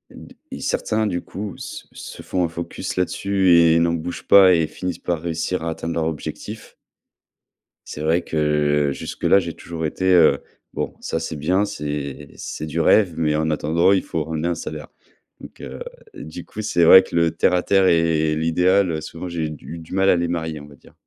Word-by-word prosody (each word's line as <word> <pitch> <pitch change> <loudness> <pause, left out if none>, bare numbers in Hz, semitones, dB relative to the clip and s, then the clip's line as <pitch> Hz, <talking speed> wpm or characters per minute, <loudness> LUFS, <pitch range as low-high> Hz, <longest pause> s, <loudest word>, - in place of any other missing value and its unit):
D - - -13 0.2
et - - -6
certains, 110 0 -1
du 85 -3 -2
coup, 100 0 -7
s - - -8
se - - -10
font 90 - -1
un 85 - 0
focus 85 +1 -6
là-dessus 95 0 +1
et 85 -1 +5
n'en 85 0 +2
bougent 85 +1 -5
pas 95 -2 +8
et 80 -2 +2
finissent 90 +2 -5
par 85 -3 -2
réussir 85 +1 -2
à 85 - -2
atteindre 80 +1 -5
leur 80 - 0
objectif. 80 -2 -6 1.1
C'est 75 - -7
vrai 80 +3 +2
que 75 -2 +1
jusque-là, 100 - +1
j'ai 85 -3 -5
toujours 80 -2 -6
été, 95 +4 +1
heu: 85 -3 +5 0.3
«Bon - - -3
ça, 80 - -2
c'est 80 -1 -5
bien, 90 +7 +1
c'est 75 -7 -5
c'est 75 - -6
du 80 +2 -3
rêve, 90 +1 +4
mais 75 -2 +1
en 80 +1 0
attendant, 80 +4 +2
il 95 -2 +2
faut, 80 -2 -3
ramener 80 +1 -3
un 85 - -1
salaire». 80 - -7 0.5
Donc, - - -13
heu, - - -8 0.3
du 340 - -9
coup, 110 - -7
c'est 85 -5 +1
vrai 95 - +10
que - - -14
le 85 -1 +3
terre 90 - +1
à 90 - +2
terre 95 -1 +3
et 80 -2 +2
et 75 - 0
l'idéal, 90 +4 +2
heu, 80 -1 -3
souvent, 85 +3 -7
j'ai 80 -3 -3
du 80 +2 -9
du 80 +1 -12
mal 95 +1 +3
à - - +5
les 85 0 0
marier, 80 -3 -3
on 75 - -12
va 70 - -15
dire. - - -21
85 Hz, 210 wpm, -21 LUFS, 80-90 Hz, 1.1 s, vrai